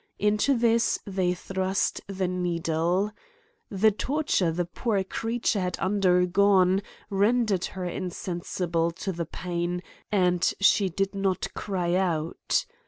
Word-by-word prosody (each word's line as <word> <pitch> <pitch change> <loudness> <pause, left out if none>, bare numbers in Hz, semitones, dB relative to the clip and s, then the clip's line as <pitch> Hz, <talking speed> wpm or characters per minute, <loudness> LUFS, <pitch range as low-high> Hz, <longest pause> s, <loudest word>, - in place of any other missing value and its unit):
Into 210 +6 +2
this 230 0 +3
they 185 -3 0
thrust 190 +1 -1
the 190 -2 -2
needle. 175 +2 0 0.6
The 215 +2 +3
tor 285 +9 -2
ture 180 - +2
the 175 +2 -1
poor 200 +3 -1
creature 225 +2 -1
had 180 -2 -2
undergone 190 0 +3 0.3
rendered 205 -1 +2
her 185 -1 -5
insensible 175 -1 -2
to 190 - -3
the 170 -2 -4
pain^ 175 +1 -3 0.3
and 180 -3 +2
she 195 0 +4
did 195 +3 -1
not 195 -1 -1
cry 180 -4 -2
out 170 -4 0
185 Hz, 120 wpm, -26 LUFS, 175-200 Hz, 0.6 s, she